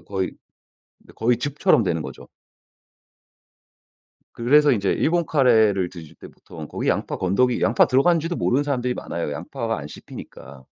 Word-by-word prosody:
거의 95 -2 -3 0.7
이제 - - -18
거의 120 +1 +1
즙처럼 140 -2 +2
되는 85 -5 -1
거죠. - - -10 2.1
그래서 145 +5 +4
이제 100 -4 0
일본 170 +1 +1
카레를 110 - +3
드실 85 -4 -12
때 - - -12
보통 75 -2 -11
거기 - - -4
양파 - - -1
건더기 120 +7 +1
양파 115 - +4
들어가는지도 165 +6 +2
모르는 135 +4 +1
사람들이 125 -3 -1
많아요, 85 -9 -4
양파가 115 - -4
안 75 - -7
씹히니까. 65 -2 -12
115 Hz, 340 characters per minute, -22 LUFS, 90-135 Hz, 2.1 s, 그래서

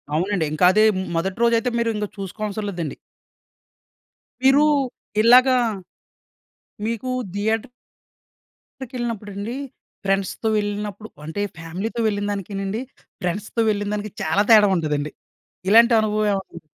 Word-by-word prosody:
అవునండి. 180 +1 0
ఇంకా 155 +3 +3
అదే 215 +3 +4
హ్మ్, 190 0 -2
మొదటి 190 +4 -2
రోజైతే 235 +1 +3
మీరు 230 -1 +1
ఇంక 210 0 -2
చూసుకోవాల్సరం 205 +2 -4
లేదండి. 170 -5 -4 1.5
మీరు 270 +2 +6 0.6
ఇలాగా 255 +3 +6 1.3
మీకు 230 +3 -3 0.2
థియేటర్... 220 +3 -1 1.2
కెళ్ళినప్పుడండి 220 -2 -4 0.5
ఫ్రెండ్స్‌తో 195 +3 -1
వెళ్ళినప్పుడు 205 0 -3 0.2
అంటే 160 +6 -4 0.2
ఫ్యామిలీతో 185 +8 -5
వెళ్ళినదానికీనండి, 205 +1 -2 0.4
ఫ్రెండ్స్‌తో 205 +5 -2
వెళ్ళినదానికి 205 0 -2
చాలా 160 +5 +2
తేడా 210 -2 +8
ఉంటదండి. 150 -3 -1 0.6
ఇలాంటి 230 +3 +7
అనుభవం 215 0 +1
ఏమన్నా 190 -3 -5
205 Hz, 100 wpm, -22 LUFS, 195-225 Hz, 1.5 s, తేడా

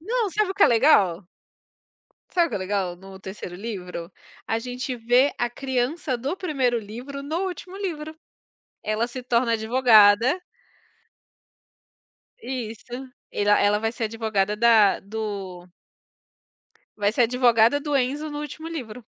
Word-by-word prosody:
não, 445 +4 -1
sabe 420 0 0
o - - -4
que 400 - +2
é - - +9
legal? 225 - +4 1.1
Sabe 345 -2 +3
o - - -6
que - - -4
é - - -2
legal 185 -2 -2
no 190 +1 -12
3º 190 -2 -8
livro? 180 -4 -6 0.4
A 225 - +1
gente 250 +2 -5
vê 245 +4 +3
a 240 - +1
criança 260 +2 -2
do 270 +7 -2
1º 265 -10 0
livro, 245 +7 -8
no 325 +7 -2
último 370 +1 -7
livro. 315 -6 -5 0.7
Ela 215 +2 0
se 255 +1 -7
torna 235 -1 +1
advogada 230 - +5 2.0
Isso. 230 -5 -5 0.5
Ela 205 0 +3
ela 205 0 +3
vai 225 +1 -1
ser 235 - -3
advogada 215 -2 -1
da 225 -3 +5
do 200 -4 -6 1.3
vai 205 -1 +1
ser 245 - +3
advogada 240 +1 +4
do 290 -1 -1
Enzo 280 +4 -1
no 295 - -5
último 300 +2 -7
livro. 250 -8 -7
240 Hz, 140 wpm, -24 LUFS, 210-280 Hz, 2.0 s, é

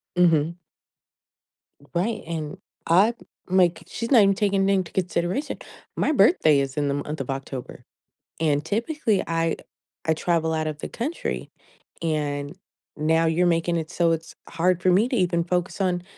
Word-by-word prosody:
Mhm. 170 -1 +3 1.4
Right, 215 +5 0
and 160 +1 -4 0.3
I 195 +8 +5 0.4
like, 180 -2 +3
she's 230 +2 -5
not 240 -6 +8
even 195 0 +4
taking 200 -1 +1
anyth 195 - +3
into 185 -3 -1
consideration. 180 - -1 0.4
My - - +2
birthday 195 - +5
is 135 0 -3
in 145 -1 +1
the 140 - 0
month 150 +2 -4
of 135 0 -5
October, 135 -1 -6 0.6
and 150 -2 +1
typically 225 - 0
I 165 0 0 0.5
I 160 - +3
travel 160 0 0
out 155 0 -1
of 150 -1 -4
the - - -5
country, 290 +9 -4 0.5
and 145 -2 -2 0.4
now 160 +2 +2
you're 165 +2 +2
making 170 0 +1
it 160 -1 -4
so 170 -1 +2
it's 165 0 -3
hard 175 +1 +1
for 185 - +4
me 205 +7 +4
to 255 - -1
even 175 -4 +1
focus 180 +2 -1
on 180 -2 0
170 Hz, 160 wpm, -24 LUFS, 155-190 Hz, 1.4 s, not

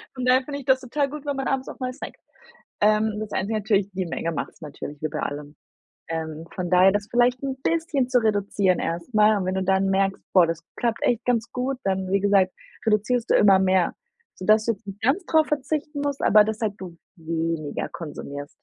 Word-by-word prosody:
Von 255 -1 -3
daher 255 +1 +4
finde 280 +1 -5
ich 275 - -11
das 265 0 +3
total 275 +3 -1
gut, 300 +1 -8
wenn 285 -1 -1
man 270 - -2
abends 265 -1 -1
auch - - -10
mal 255 -1 -3
snackt. 285 - -9 0.6
Ähm, 215 0 +2
das 215 -1 -6
einzige 215 +3 -1
natürlich: 200 -2 +1
die 185 -1 -2
Menge 165 0 -3
macht's 160 - -5
natürlich 150 -1 -8
wie 155 - 0
bei - - -4
allem. 145 +1 -5 0.5
Ähm, 160 -1 -4
von 180 -2 -3
daher 185 +2 +6
das 205 +1 -2
vielleicht 245 +1 +2
'n 270 -1 -2
bisschen 320 -6 0
zu 255 -1 +4
reduzieren 200 -3 +1
erstmal. 210 +5 +2
Und 190 - -2
wenn 185 +1 -1
du 190 - 0
dann 190 +1 +2
merkst: 195 0 +1
„Boah, 180 -3 +6
das 165 0 -3 0.2
klappt 235 -2 -1
echt 235 -1 +1
ganz 230 -2 0
gut“, 255 +2 -2
dann 190 -1 -1
wie 200 - +3
gesagt, 195 -2 +3 0.3
reduzierst 225 +3 +1
du - - +5
immer 195 -2 +6
mehr, 185 -2 +2 0.4
so 185 - -8
dass 215 +1 +4
du 230 - +2
jetzt 200 +1 -18
nicht 195 +1 -8
ganz 280 - +1
darauf 315 -1 +3
verzichten 295 0 -2
musst, 285 -1 -2
aber 210 0 +7
dass 220 +1 -3
halt 215 -2 0
du 180 -3 -8 0.2
weniger 165 -2 -3
konsumierst. 145 -3 -7
210 Hz, 215 wpm, -24 LUFS, 185-255 Hz, 0.6 s, aber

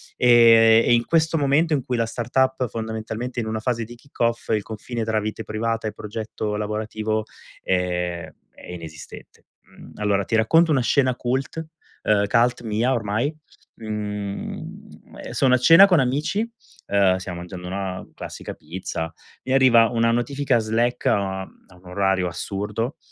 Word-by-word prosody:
E 115 -2 +6
e - - +4
in 120 0 +2
questo 165 0 +2
momento, 150 +3 +2
in 135 -4 0
cui 125 -2 -2
la 115 - +1
startup, 125 +3 0
fondamentalmente, 110 +2 -5
è - - -1
in 110 - -4
una 110 0 -2
fase 115 0 -2
di 120 +2 -11
kick 140 +4 -22
off, 115 0 0
il 110 -2 +2
confine 115 +2 -5
tra 110 -1 0
vite 110 +1 -4
privata 110 +1 -2
e - - -4
progetto 105 0 -5
lavorativo, 110 +1 -2 0.4
ehm, 90 -2 -1 0.2
è - - -14
inesistente. 80 -3 -11 0.2
Mhmm, - - -16
allora, 100 -1 0
ti 115 - -1
racconto 160 +10 +4
una 135 -4 +3
scena 130 0 +2
cult 135 +6 -3 0.4
ehm, 105 -1 +3
cult 120 +2 +2
mia, 115 +4 0
ormai. 115 +6 -1 0.4
Uhm, 105 -2 -6
sono 130 -2 +2
a - - +6
cena 165 +10 +8
con 180 -6 +4
amici, 150 - 0 0.4
ehm, 100 -2 +3
stiamo 90 -2 -6
mangiando 90 0 -8
una 95 0 -4
classica - - -8
pizza, 80 0 -5 0.3
mi 130 - -1
arriva 120 -4 +6
una 115 -1 +2
notifica 130 +1 +1
Slack 115 +3 -1
a 95 -1 0
a 95 -1 -14
un 90 +1 -21
orario 95 0 0
assurdo, 105 - -4
110 Hz, 160 wpm, -23 LUFS, 100-125 Hz, 0.4 s, cena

